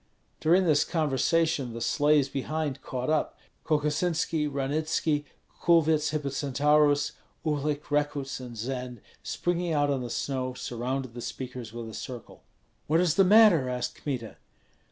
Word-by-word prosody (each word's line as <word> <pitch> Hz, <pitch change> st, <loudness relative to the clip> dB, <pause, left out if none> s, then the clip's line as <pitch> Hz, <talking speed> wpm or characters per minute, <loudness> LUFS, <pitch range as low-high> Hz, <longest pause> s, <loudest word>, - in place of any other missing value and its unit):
During 180 Hz, +4 st, +4 dB
this 150 Hz, -3 st, +4 dB
conversation 155 Hz, -3 st, +1 dB
the 115 Hz, -, -5 dB
sleighs 145 Hz, +4 st, +3 dB
behind 140 Hz, 0 st, -3 dB
caught 130 Hz, +3 st, -3 dB
up; 155 Hz, -, 0 dB, 0.3 s
Kokosinski, 155 Hz, +1 st, 0 dB
Ranitski, 145 Hz, +2 st, -1 dB, 0.4 s
Kulvyets 160 Hz, -2 st, +3 dB
Hippocentaurus, 145 Hz, 0 st, +2 dB, 0.3 s
Uhlik, 150 Hz, -1 st, 0 dB
Rekuts, 145 Hz, -2 st, -1 dB
and 125 Hz, -2 st, -9 dB
Zend, 125 Hz, 0 st, -5 dB, 0.2 s
springing 175 Hz, -1 st, -1 dB
out 145 Hz, -1 st, +2 dB
on 135 Hz, -2 st, -1 dB
the 120 Hz, -, -5 dB
snow, 130 Hz, 0 st, -2 dB
surrounded 125 Hz, +1 st, -4 dB
the 120 Hz, -, -7 dB
speakers 125 Hz, -2 st, -6 dB
with 115 Hz, 0 st, -7 dB
a 110 Hz, -, -9 dB
circle. 120 Hz, +1 st, -8 dB, 0.5 s
"What 160 Hz, +2 st, +3 dB
is 175 Hz, -3 st, +3 dB
the 195 Hz, -, +5 dB
matter?" 190 Hz, -, +6 dB
asked 125 Hz, -1 st, -2 dB
Kmita. 125 Hz, -6 st, -4 dB
145 Hz, 135 wpm, -28 LUFS, 130-155 Hz, 0.5 s, matter